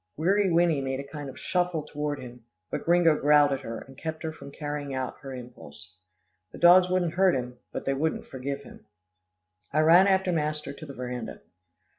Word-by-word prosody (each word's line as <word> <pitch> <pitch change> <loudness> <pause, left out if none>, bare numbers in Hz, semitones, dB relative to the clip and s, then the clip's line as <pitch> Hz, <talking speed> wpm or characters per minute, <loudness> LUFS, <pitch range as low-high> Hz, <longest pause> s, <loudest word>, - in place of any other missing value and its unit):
Weary 190 +4 +2
Winnie 165 -4 +3
made 135 0 -2
a - - -4
kind 145 -2 -7
of 130 - -11
shuffle 180 -3 -1
toward 150 -1 -3
him, 125 -1 -11 0.3
but - - -4
Gringo 170 -2 +4
growled 145 0 +4
at 135 - -1
her, 115 -4 -6
and 135 - -13
kept 160 +3 -6
her 160 - -2
from 140 - -11
carrying 145 -1 -5
out 130 -1 -4
her 135 - -9
impulse. 120 - -10 0.6
The - - -10
dogs 180 +1 +7
wouldn't 180 -2 +1
hurt 185 0 +4
him, 125 -1 -5
but - - -5
they 135 - +1
wouldn't 155 +4 -1
forgive 140 +2 -5
him. - - -15 0.8
I 150 +2 +3
ran 170 +5 +7
after 190 -1 +2
master 150 -3 -2
to 155 - -10
the 140 - -9
veranda. 125 -2 -6
150 Hz, 195 wpm, -27 LUFS, 135-170 Hz, 0.8 s, dogs